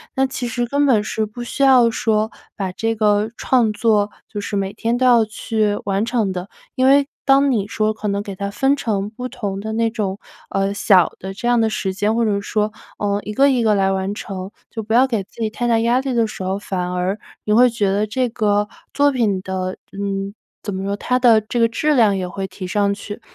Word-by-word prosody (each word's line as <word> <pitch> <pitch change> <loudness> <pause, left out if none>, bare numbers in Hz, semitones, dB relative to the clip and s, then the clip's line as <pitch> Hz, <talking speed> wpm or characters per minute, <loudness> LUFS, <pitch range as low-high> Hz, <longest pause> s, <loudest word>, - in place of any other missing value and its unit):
那 265 0 +2
其 255 -2 -4
实 240 +1 -2
根 285 +3 +1
本 230 -7 +3
是 220 0 -2
不 240 +3 -8
需 275 +3 -2
要 255 -3 +6
说， 220 -1 0 0.3
把 190 -2 -3
这 225 +4 -1
个 210 0 +1
创 235 -4 +2
作 210 -1 +2 0.2
就 210 - -4
是 205 0 -4
每 195 0 -1
天 230 +2 -1
都 255 +1 +2
要 235 -3 +5
去 215 -1 -1
完 200 +2 0
成 230 -5 0
的， 180 +1 -5 0.3
因 255 - +2
为， 275 +1 +5 0.2
当 275 0 +4
你 210 -5 0
说 215 0 0
可 215 - -5
能 200 0 -1
给 200 -2 -7
它 200 +1 -3
分 270 +7 +2
成 210 -7 -2
不 250 +3 -5
同 195 -5 -4
的 220 +2 -5
那 230 +1 +1
种 200 -4 -2 0.3
呃 195 0 0
小 190 -4 +4
的 190 +1 -6
这 220 +5 -4
样 240 -1 +3
的 225 - +2
时 190 -3 -2
间， 205 +3 0
或 230 0 +2
者 200 -2 0
说， 210 +1 -1 0.3
呃 205 0 -1
一 210 - -5
个 275 +4 +5
一 255 -3 +2
个 215 -2 +3
来 195 -1 +2
完 190 +1 -2
成， 190 -2 -6 0.2
就 225 - -4
不 220 +2 -1
要 255 +2 +6
给 230 -6 -1
自 205 - -20
己 - - +1
太 240 +2 -2
大 230 -1 +3
压 235 +3 +2
力 270 0 -3
的 230 -1 +3
时 215 - -7
候， 190 +1 -1
反 180 -3 -3
而， 180 +3 -1 0.2
你 210 - +1
会 245 +3 +6
觉 220 -4 0
得 205 +2 0
这 250 +4 0
个 210 -2 +1 0.3
作 285 0 +4
品 220 -7 +1
的 185 -1 -3
嗯 195 0 -3 0.3
怎 205 - -4
么 190 0 -4
说， 200 +1 -2
它 250 +4 0
的 235 -3 +6
这 215 +3 -3
个 230 - +5
质 300 +7 0
量 215 -6 +4
也 185 -1 -3
会 190 +1 -5
提 185 0 -8
上 200 +2 +1
去。 205 +1 -8
215 Hz, 255 characters per minute, -20 LUFS, 200-235 Hz, 0.3 s, 要